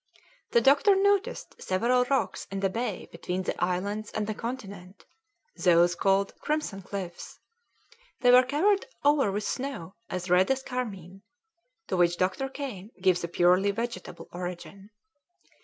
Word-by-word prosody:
The 235 - +4
doctor 285 - +5
noticed 405 +4 0
several 240 +7 +2
rocks 270 +1 -1
in 195 0 -4
the 195 -1 +1
bay 225 -2 -3
between 180 +2 -4
the - - -2
islands 200 +4 -2
and 215 - -1
the 215 - -2
continent, 200 -6 -7 0.5
those 175 -1 +4
called 195 +2 +1
Crimson 300 -10 -2
Cliffs; 185 -2 -7 0.8
they 245 -1 +6
were 250 +1 +9
covered 345 - +1 0.2
over 285 -7 +4
with 205 +2 -2
snow 250 -8 -4 0.2
as 180 -1 -4
red 180 +1 +4
as 265 0 0
carmine, 195 -8 -5 0.6
to - - -2
which 175 -1 +3
Dr. 190 +9 0
Kane 250 -9 -6
gives 185 -2 +2
a - - -1
purely 180 +3 +3
vegetable 230 +3 -5
origin. 180 +3 -7
200 Hz, 140 wpm, -28 LUFS, 185-255 Hz, 0.8 s, were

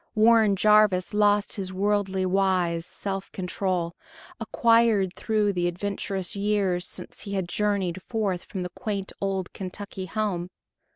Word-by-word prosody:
Warren 220 -2 +5
Jarvis 210 -3 +4
lost 205 0 +2
his 190 -2 -4
worldly 195 -1 0
wise 185 -3 +1
self 195 -1 -5
control, 180 -2 -2 0.5
acquired 230 -4 +3
through 210 -2 0
the 175 -1 0
adventurous 190 0 -3
years 200 -3 0
since - - -6
he 200 - -6
had 190 -3 -1
journeyed 190 -2 -1
forth 200 -5 -2
from 190 -3 -5
the 180 - -4
quaint 205 -5 -4
old 195 -2 -2
Kentucky 190 0 -6
home. 185 -3 -2
195 Hz, 130 wpm, -26 LUFS, 185-210 Hz, 0.5 s, Warren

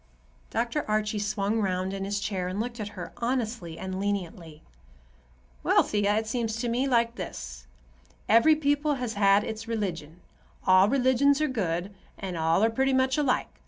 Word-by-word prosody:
Dr. 235 +6 -1
Archie 215 0 0
swung 205 +1 -1
round 185 -1 -1
in 195 0 -3
his 200 +1 -2
chair 190 -3 -2
and 185 +3 -4
looked 235 +1 -4
at 210 - -3
her, 175 - -7
honestly 235 -9 -2
and 190 0 -5
leniently. 175 -6 -4 1.0
"Well, - - +4
Thea, 205 0 +1
it 220 +1 0
seems 225 0 -2
to 235 +2 -2
me 250 +4 0
like 235 -2 +1
this. 65 - -7 0.6
Every 230 +8 +6
people 290 0 +1
has 250 -4 -3
had 200 0 +4
its 220 +1 -6
religion. 180 -7 -4 0.4
All 185 +2 +6
religions 270 +2 +3
are 305 - +2
good, 190 - -2 0.2
and 185 -2 -5
all 165 +4 +2
are 225 - +3
pretty 265 +3 +1
much 260 0 +2
alike. 285 -4 -1
215 Hz, 165 wpm, -27 LUFS, 190-245 Hz, 1.0 s, Every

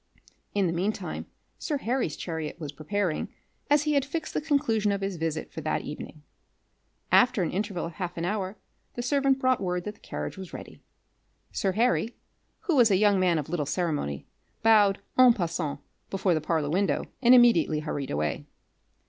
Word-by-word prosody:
In 200 -2 +3
the 170 - 0
mean 185 +5 +1
time - - -6 0.3
sir 295 - -1
Harry's 245 - -1
chariot 160 -1 -5
was 150 -4 -5
preparing, 170 +3 -2 0.4
as 290 0 +4
he 300 0 +1
had 280 -2 +3
fixed 310 +3 -4
the - - 0
conclusion 270 -9 +1
of 200 0 -2
his 195 -2 -3
visit 160 -1 -3
for 160 - -5
that 155 - -1
evening. 150 0 -8 0.9
After 250 -6 +5
an - - -1
interval 195 -2 -2
of 170 - -5
half 180 0 -5
an 165 - -2
hour 195 +1 -2 0.4
the 240 - -3
servant 275 +1 +2
brought 255 -3 +2
word 180 -2 -1
that 210 - -5
the - - -26
carriage - - -6
was 190 -2 -9
ready. - - -9 0.7
Sir 190 -1 0
Harry, 235 +1 +1 0.5
who 375 -7 0
was 240 -4 +6
a 195 - +4
young 205 -1 +4
man 180 -3 +3
of 150 - -3
little 155 -3 -2
ceremony, 150 - -2 0.4
bowed 210 -3 +5 0.2
en 255 -2 +8
passant 165 -7 -2 0.3
before 195 -2 +1
the 155 - 0
parlour 155 -2 0
window, 180 -3 +1 0.2
and 250 0 +7
immediately 170 -11 +5
hurried 145 -3 -4
away. 75 +1 -2
190 Hz, 180 wpm, -27 LUFS, 165-235 Hz, 0.9 s, en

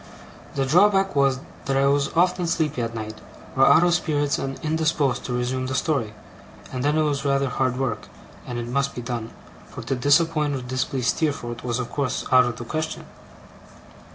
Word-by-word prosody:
The 135 - +1
drawback 195 +5 +4
was, 135 -2 +2 0.2
that 135 -1 0
I 135 - +3
was 140 0 +2
often 180 +1 +2
sleepy 160 -6 0
at 115 0 -3
night, 110 -1 -6 0.3
or 135 0 +5
out 175 -1 +6
of 175 -1 +3
spirits 145 -4 0
and 135 0 -4
indisposed 155 -4 +1
to 125 - -3
resume 130 +1 -1
the 130 - -3
story; 130 -7 -1 0.6
and 125 -1 -2
then 150 +2 +2
it 155 - +3
was 145 -2 -1
rather 140 -1 +1
hard 130 -1 0
work, 130 -5 -2 0.4
and 120 - -4
it 120 - -3
must 140 +3 -1
be 120 - -4
done; 115 -2 -4 0.4
for - - -9
to - - -2
disappoint 150 +2 +2
or 130 - -4
to - - -10
displease 130 0 -1
Steerforth 120 -7 -2
was 120 -1 -1
of 125 -1 -4
course 140 -3 -2
out 130 -1 +7
of 120 -1 -2
the 120 - -7
question. 155 +5 -4
135 Hz, 195 wpm, -24 LUFS, 125-155 Hz, 0.6 s, out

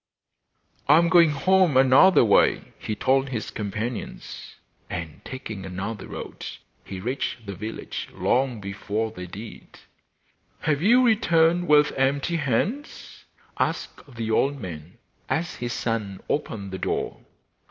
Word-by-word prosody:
'I 150 - +8
am 170 0 +4
going 170 -2 +6
home 175 +1 +3
another 135 +5 +6
way,' 105 - +3
he 110 - -3
told 135 +3 +2
his 120 -5 -4
companions. 110 +3 -5 0.3
And 80 -2 -6
taking 110 -6 -7
another 95 +3 -5
road - - -8 0.4
he 95 - -7
reached 120 +1 -3
the 100 - -5
village 105 +4 -6
long 125 -2 0
before 105 +2 -3
they 90 -4 -8
did. 105 +5 -10 0.8
'Have 150 -1 0
you 245 +7 +5
returned 175 -6 +3
with 150 0 +5
empty 140 +5 +1
hands?' 165 - -2 0.3
asked 135 - -3
the 115 -1 -3
old 140 +5 +2
man, 85 -5 -8 0.3
as 170 +2 -1
his 120 0 -4
son 110 -5 -2
opened 100 -9 -3
the 95 - -5
door. - - -2
125 Hz, 130 wpm, -25 LUFS, 105-155 Hz, 0.8 s, I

